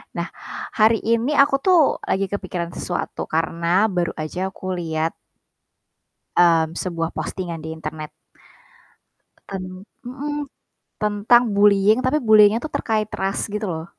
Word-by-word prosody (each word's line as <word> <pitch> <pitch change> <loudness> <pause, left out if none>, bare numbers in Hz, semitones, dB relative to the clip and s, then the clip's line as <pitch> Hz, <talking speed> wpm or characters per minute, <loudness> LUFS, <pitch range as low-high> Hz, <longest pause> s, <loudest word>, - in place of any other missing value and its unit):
Nah, - - -2 0.4
hari 220 0 +3
ini 230 +6 +1
aku 275 0 +4
tuh 365 +3 +4 0.2
lagi 195 0 -1
kepikiran 180 -4 -4
sesuatu 175 0 -4
karena 170 +4 +1
baru 175 -2 -1
aja 175 +5 -3
aku 185 0 -6
lihat 165 -2 -2 1.2
mmm, 165 -1 +4
sebuah 165 -2 -3
postingan 170 -4 -5
di 160 - -5
internet. 155 -1 -7 1.4
Ten 195 -1 -5 0.4
mhm, 290 +4 -4 0.6
tentang 210 +4 +4
bullying 205 +2 +4
tapi 255 +3 +1
bullying-nya 215 0 +5
tuh 310 - -5
terkait 215 -2 -1
ras 195 +1 -2
gitu 210 0 -3
loh. 160 -2 -4
195 Hz, 125 wpm, -22 LUFS, 170-225 Hz, 1.4 s, bullying-nya